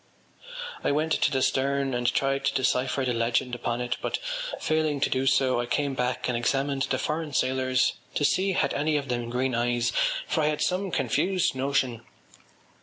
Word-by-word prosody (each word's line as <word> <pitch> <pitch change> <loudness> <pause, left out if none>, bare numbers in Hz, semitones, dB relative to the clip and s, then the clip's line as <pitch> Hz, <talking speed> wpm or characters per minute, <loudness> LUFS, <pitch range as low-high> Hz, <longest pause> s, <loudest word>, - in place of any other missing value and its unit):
I - - +2
went 155 +2 0
to - - +2
the 130 -2 +1
stern 140 0 +1
and 120 0 +1
tried 135 0 0
to 140 - +2
decipher 130 +1 +1
the 125 - 0
legend 115 +2 0
upon 120 0 -2
it 125 0 -2
but, - - -1 0.4
failing 155 -2 0
to - - +1
do 130 +1 +1
so, 130 -2 +3
I 120 - -2
came 140 +2 0
back 125 -1 -1
and 125 - 0
examined 135 +3 0
the 130 - +1
foreign 155 +1 -3
sailors 130 0 +2 0.2
to 145 - +2
see 190 +4 +2
had 185 - +1
any 150 +1 +1
of 140 -2 -4
them 120 -1 -2
green 125 +2 0
eyes 120 0 +1 0.3
for 160 - 0
I 150 - +2
had 150 0 -1
some 180 +5 0
confused 185 +1 +1
notion.... 130 -3 0
135 Hz, 185 wpm, -27 LUFS, 125-145 Hz, 0.4 s, so